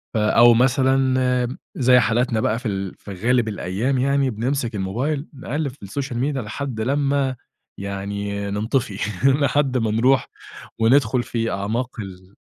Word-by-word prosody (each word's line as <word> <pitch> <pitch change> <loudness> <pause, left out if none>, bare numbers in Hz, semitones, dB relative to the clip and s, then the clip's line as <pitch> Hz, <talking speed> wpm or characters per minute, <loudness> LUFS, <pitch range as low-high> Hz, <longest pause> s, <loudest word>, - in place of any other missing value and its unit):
آآ 105 -1 +2
أو 120 0 +7
مثلًا 130 0 +2 0.2
زي 125 -1 +5
حالاتنا 115 0 +1
بقى 110 +1 0
في 125 - -5
ال 95 -2 -3
في 100 - -9
غالب 115 +5 +1
الأيام 105 +6 -1
يعني، 140 +1 +2
بنمسك 120 +1 -2
الموبايل 130 +10 -2
نقلِّب 140 +1 -3
في 125 - -18
السوشيال 125 +4 -4
ميديا 135 +1 -1
لحد 120 +1 -5
لمّا 140 +1 0 0.4
يعني 100 +1 -4
ننطفي، 110 +2 -1 0.3
لحد 135 -1 +2
ما 115 -3 0
نروح 125 +5 +3 0.5
وندخل 120 +1 +3
في 115 -1 -2
أعماق 115 +6 -3
ال 95 -1 -9
120 Hz, 140 wpm, -22 LUFS, 105-135 Hz, 0.5 s, أو